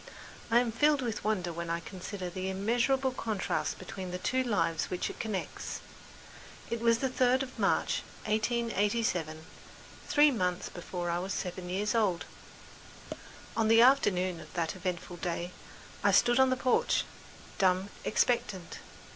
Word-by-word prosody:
I 230 - +4
am 245 -2 0
filled 290 +4 +3
with 225 -3 -3
wonder 185 -5 0
when 170 0 -5
I 170 0 0
consider 185 +1 -6
the 185 +1 -4
immeasurable 240 +7 +1
contrasts 220 -5 -2
between 185 0 -7
the 180 - -3
two 255 +8 0
lives 200 -9 +1
which 180 - -2
it - - -13
connects. 215 -5 -4 0.9
It 235 -1 -2
was 230 0 +4
the 265 - 0
third 255 +1 +2
of 255 -1 -9
March, - - +2 0.2
1887, 215 -7 0 0.6
three 295 0 +5
months 180 -7 -1
before 175 0 -4
I 170 - 0
was 190 +2 -3
seven 180 -1 -4
years 205 +4 0
old. 205 -7 +1 1.3
On 225 -1 +2
the 225 +1 +7
afternoon 185 -10 +3
of - - -12
that 165 -1 -1
eventful 180 -1 -4
day, 175 0 -3 0.5
I - - +5
stood 240 +1 +4
on 265 0 +6
the 255 - +1
porch, 255 -1 +2 0.6
dumb, 185 +1 +3
expectant. 210 -6 0
205 Hz, 145 wpm, -31 LUFS, 180-235 Hz, 1.3 s, the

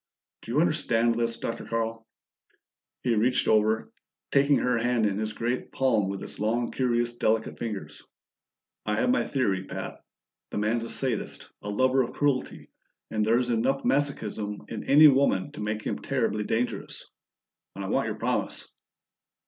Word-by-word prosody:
"Do - - -8
you 140 - +2
understand 120 -8 +2
this, 115 0 -1
Dr. 115 - -4
Carl?" 115 0 -3 1.0
He 120 - +2
reached 120 +4 +2
over, 110 +1 +2 0.4
taking 140 0 +4
her 125 -2 +1
hand 120 -1 +1
in 100 -1 0
his 110 0 -2
great 120 +3 -3
palm 110 -7 +2
with 100 0 -4
its - - -8
long, 115 +3 0
curious 120 -2 0
delicate 110 0 0
fingers. 110 -4 -5 0.9
"I 105 - +1
have 250 - +2
my 260 - +2
theory, 100 -9 0
Pat. - - -7 0.5
The - - -5
man's 110 +3 0
a - - -7
sadist, 130 -5 -1
a 105 - -5
lover 130 +5 +3
of 120 - -3
cruelty, 145 -3 -1 0.4
and 110 -1 +1
there's 120 +3 +2
enough 130 +4 +1
masochism 110 -7 -1
in 110 - -4
any 150 +3 +9
woman 135 -9 +3
to - - -8
make 110 0 -2
him - - -2
terribly 115 -6 -1
dangerous. 120 +4 -2 0.7
I - - -5
want - - +1
your - - -3
promise." - - -2
115 Hz, 155 wpm, -27 LUFS, 110-130 Hz, 1.0 s, any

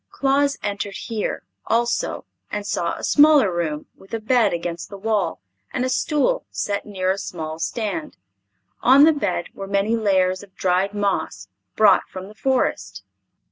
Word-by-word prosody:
Claus 280 +1 +1
entered 200 -1 -3
here, 225 -3 -3 0.2
also, 235 +1 0 0.2
and 205 -1 -4
saw 170 -4 -1
a - - -10
smaller 290 - +5
room 155 -3 -2
with 195 +4 -8
a - - -3
bed 235 +1 +3
against 170 0 -4
the 200 - -8
wall 205 -4 -1 0.3
and 255 - -1
a - - -1
stool 305 - +1
set 200 0 -3
near 185 -2 -1
a 195 - -2
small 160 -4 -6
stand. 200 -3 -3 0.6
On 270 +3 +7
the 320 +1 +7
bed 200 - -2
were 195 - -7
many 200 +3 +1
layers 185 -4 +1
of 200 -2 -16
dried 190 +2 0
moss 190 - -2 0.3
brought 210 -3 +4
from 185 +1 -8
the - - -12
Forest. 260 +4 -1
200 Hz, 160 wpm, -22 LUFS, 185-235 Hz, 0.6 s, On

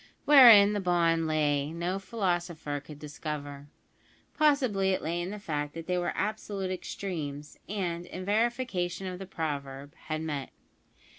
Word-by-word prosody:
Wherein 230 -8 +9
the 205 - 0
bond 170 -3 +2
lay 150 -2 +1
no 175 +3 -2
philosopher 175 -7 -2
could 145 +1 -12
discover. 145 -1 -6 0.7
Possibly 255 -11 +2
it - - -2
lay 170 +2 -1
in 175 - -4
the 210 - -5
fact 150 -6 -4
that 165 -1 -6
they 180 0 0
were 175 - -1
absolute 205 -2 -3
extremes, 155 -6 -5
and, 175 -4 -3
in 185 0 -7
verification 205 -4 -1
of 180 -1 -5
the 195 - -7
proverb, 145 -5 -5
had 155 0 -2
met. 145 -4 -4
175 Hz, 145 wpm, -29 LUFS, 150-195 Hz, 0.7 s, Wherein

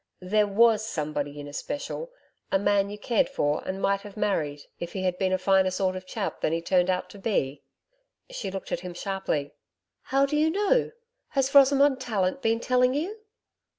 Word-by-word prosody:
There 210 +3 +2
WAS 220 +1 +4
somebody 150 -7 -3
in 145 - -7
especial 285 - -5 0.4
a - - +4
man 200 0 +2
you 205 - -6
cared 240 +6 +1
for 150 - 0
and 190 +1 -3
might 195 0 +1
have 205 +1 -11
married 155 -9 -1 0.2
if 170 - -6
he 190 - -3
had 185 -1 +1
been 190 -1 +1
a 185 - +2
finer 190 0 +3
sort 185 0 -1
of 185 0 -7
chap 205 -1 -4
than - - +1
he 165 - 0
turned 180 +1 +2
out 185 0 0
to 200 - -12
be?' 145 -10 -1 0.7
She 220 - -4
looked 190 0 -6
at - - 0
him 180 -1 -8
sharply. 190 -7 -2 0.5
'How 275 +1 +2
do 290 +2 -2
you 310 +1 +3
know? 415 +7 +2 0.4
Has 270 -1 0
Rosamond 280 -1 +5
Tallant 215 0 -1
been 225 0 +1
telling 250 +1 +2
you?' 345 +9 -2
195 Hz, 190 wpm, -26 LUFS, 185-250 Hz, 0.7 s, Rosamond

